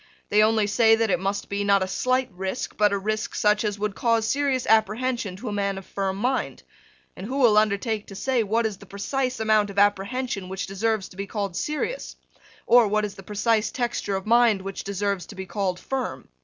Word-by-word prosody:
They 210 - +4
only 215 0 +3
say 225 +2 +4
that 225 -2 0
it 180 - +2
must 195 +2 -2
be, 200 0 -2
not 200 -1 +3
a - - -3
slight 255 +5 0
risk, 190 +5 -4
but 210 -1 +3
a 200 - +1
risk 215 +2 -3
such 210 +1 +2
as 210 -2 -1
would 210 0 -2
cause 230 0 +1
serious 275 -2 0
apprehension 220 -1 +1
to 210 +7 -8
a - - -2
man 200 -1 -1
of 195 - -8
firm 195 -1 -3
mind; 255 +5 -1 0.5
and 185 - -7
who 265 +3 -3
will 240 -6 +5
undertake 215 +1 +1
to 195 - -10
say 255 +3 0
what 225 +2 0
is 215 -3 -2
the 200 - -14
precise 255 +6 -2
amount 215 -2 +3
of 200 - -9
apprehension 205 +1 0
which 190 0 -4
deserves 205 +1 -1
to 180 - -16
be 200 0 -4
called 200 -4 -3
serious, 305 - -3 0.5
or 240 -2 +6
what 215 +1 +1
is 205 - -6
the - - -11
precise 210 +3 0
texture 240 -5 -2
of 190 - -4
mind 230 -3 +4
which 195 0 -5
deserves 200 -1 -2
to 205 - -11
be 190 0 -6
called 185 -2 -2
firm. 265 -1 -4
210 Hz, 215 wpm, -25 LUFS, 195-230 Hz, 0.5 s, or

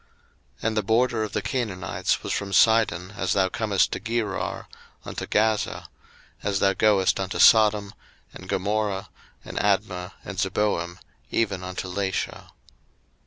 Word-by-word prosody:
01:010:019 - - 0
And 110 -1 -1
the - - +3
border 115 +2 +2
of 105 - -5
the - - 0
Canaanites 110 -8 -2
was - - -2
from 100 0 -3
Sidon, 105 -3 +3
as 95 - 0
thou 95 -1 +2
comest 100 -1 +1
to - - -3
Gerar, 110 -4 -3 0.4
unto - - -5
Gaza; 110 0 0 0.5
as 100 -1 0
thou 95 0 +3
goest, 100 -2 +3
unto 95 -2 -3
Sodom, 105 0 +5 0.4
and 95 - -11
Gomorrah, 100 0 -1 0.4
and - - -8
Admah, 90 +1 0
and 100 -2 -6
Zeboim, 95 -3 0 0.3
even 100 -5 -1
unto 90 +1 -5
Lasha. 95 0 -3
100 Hz, 140 wpm, -25 LUFS, 95-110 Hz, 0.5 s, Sodom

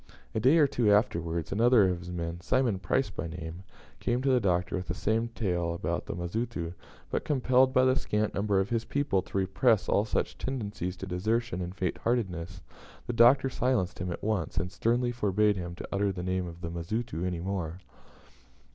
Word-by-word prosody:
A - - 0
day 130 +9 +5
or 155 - +6
two 120 -6 +2
afterwards, 85 -6 +1
another 115 0 +5
of 90 -1 -1
his 90 0 -9
men 85 0 -4
Simon 120 -1 +1
Price 105 +3 0
by 85 - -4
name 85 +1 -7 0.4
came 120 +2 0
to 135 - +2
the 125 - +4
Doctor 90 -4 0
with 90 -1 -4
the 90 - -3
same 110 +4 0
tale 90 -7 -1
about - - -3
the - - -4
Mazitu, 85 -1 -3 0.4
but, - - -1
compelled 130 -2 +3
by 130 -1 +4
the 130 0 +4
scant 105 -5 0
number 100 -1 +1
of 95 +1 0
his 115 -1 +1
people 140 -8 0
to 95 - -6
repress 100 +4 +2
all 100 - +3
such 110 - -2
tendencies 100 -8 -3
to 95 - -6
desertion 110 +3 -1
and 90 +1 -5
faint 90 -3 -2
heartedness, 90 -7 -2 0.4
the 120 - -3
Doctor 120 +4 +6
silenced 125 -7 0
him 90 0 -3
at - - -6
once, 100 -9 -1
and 90 +2 -1
sternly 120 +4 +1
forbade 105 -2 +2
him 85 -2 -5
to - - -7
utter 100 0 +1
the 90 -2 -5
name 90 0 -1
of 85 0 -10
the 85 - -4
Mazitu 85 +3 -3
any 90 -2 -2
more. 90 -2 -3
100 Hz, 200 wpm, -29 LUFS, 90-120 Hz, 0.4 s, or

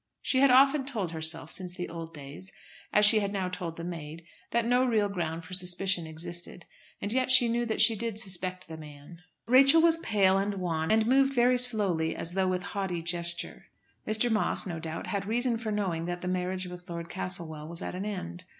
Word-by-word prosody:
She 260 - +1
had 275 0 +5
often 270 +3 +5
told 220 - -3
herself, 160 0 -1
since 180 -2 -1
the 180 -2 -5
old 165 -1 -8
days, 150 +5 -8 0.4
as 210 0 +5
she 215 +1 +8
had 200 -1 -2
now 190 -2 -2
told 175 -3 -5
the 165 - -8
maid, 165 -2 -7 0.3
that 235 0 0
no 245 +2 +3
real 220 -5 +1
ground 170 -4 -4
for 185 - -11
suspicion 180 -1 0
existed; 175 +2 -6 0.3
and 205 - -2
yet 255 0 0
she 255 -2 +6
knew 235 +1 -1
that 220 - +3
she 225 0 +5
did 225 0 -3
suspect 185 -3 -2
the 160 - -8
man. 150 +2 -13 0.2
Rachel 275 +6 +6
was 330 0 +4
pale 195 -7 +2
and 200 +1 -2
wan, 165 -4 -2
and 220 0 +3
moved 270 +3 +3
very 250 +1 +4
slowly 200 -10 +2
as 165 - -1
though 190 +1 0
with 185 0 -1
haughty 190 -4 -4
gesture. 170 0 -2 0.4
Mr. 220 +2 +2
Moss, 220 0 +1
no 170 -4 -5
doubt, 160 0 -5
had 200 -1 -3
reason 235 +1 0
for 225 -2 -4
knowing 185 -6 -2
that 175 0 -4
the 180 - -5
marriage 185 0 -2
with 180 0 -10
Lord 170 -1 -6
Castlewell 155 - -5
was 170 +1 -1
at - - -5
an 185 +2 -5
end. 180 -3 -6
185 Hz, 210 wpm, -28 LUFS, 170-225 Hz, 0.4 s, she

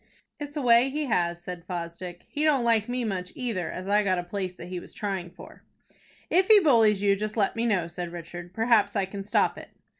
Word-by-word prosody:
"It's 290 0 -6
a 290 - -2
way 240 +2 +5
he 300 +2 -2
has," 175 -7 0
said 180 -2 -7
Fosdick. 175 0 -6
"He 295 - -3
don't 290 -5 +3
like 230 -1 +2
me 250 0 -1
much 185 -4 -3
either, 225 -9 -3
as 185 +1 -6
I 205 +1 +4
got 190 -3 +1
a 175 - -2
place 185 0 -4
that - - -9
he 180 0 -5
was - - -13
trying 190 -4 -3
for." 175 - -14 0.7
"If 370 +2 +4
he 435 -2 +8
bullies 225 - +4
you, 200 -1 +4
just 215 +2 -4
let 200 -3 +1
me 230 +1 0
know," 185 -6 +1
said 175 0 -6
Richard. 175 +1 -8
"Perhaps 220 -1 +2
I 200 -2 +1
can 195 +1 -7
stop 205 - +1
it." - - -12
200 Hz, 230 wpm, -26 LUFS, 180-235 Hz, 0.7 s, he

